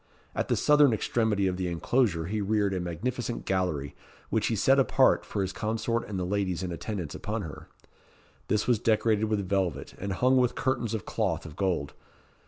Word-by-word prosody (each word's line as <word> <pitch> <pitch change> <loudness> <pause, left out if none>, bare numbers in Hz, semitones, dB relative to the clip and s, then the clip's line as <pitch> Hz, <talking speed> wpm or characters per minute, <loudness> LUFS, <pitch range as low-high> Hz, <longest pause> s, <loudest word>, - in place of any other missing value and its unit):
At - - -1
the - - +2
southern 150 -4 +5
extremity 110 -2 +1
of 90 -1 0
the 90 -1 -2
inclosure 90 0 +1
he 105 +4 -2
reared 100 -1 +1
a 95 - -1
magnificent 115 +8 -3
gallery, 80 -7 -1 0.4
which - - +1
he - - 0
set - - +4
apart - - +4
for 100 - -1
his 95 0 -3
consort 110 +3 -1
and 100 - -3
the 90 - -1
ladies 95 -2 -1
in 90 - -3
attendance 85 -3 -4
upon 105 +1 -3
her. 75 -4 -9 0.8
This 105 -1 +1
was 120 -4 +2
decorated 110 -1 +2
with 105 -3 -1
velvet, 90 -8 -1
and 100 0 -3
hung 130 +5 +3
with 125 -1 +2
curtains 120 -4 -1
of 110 - -5
cloth - - -1
of 75 -2 -9
gold. 90 -8 -1
100 Hz, 190 wpm, -28 LUFS, 90-115 Hz, 0.8 s, southern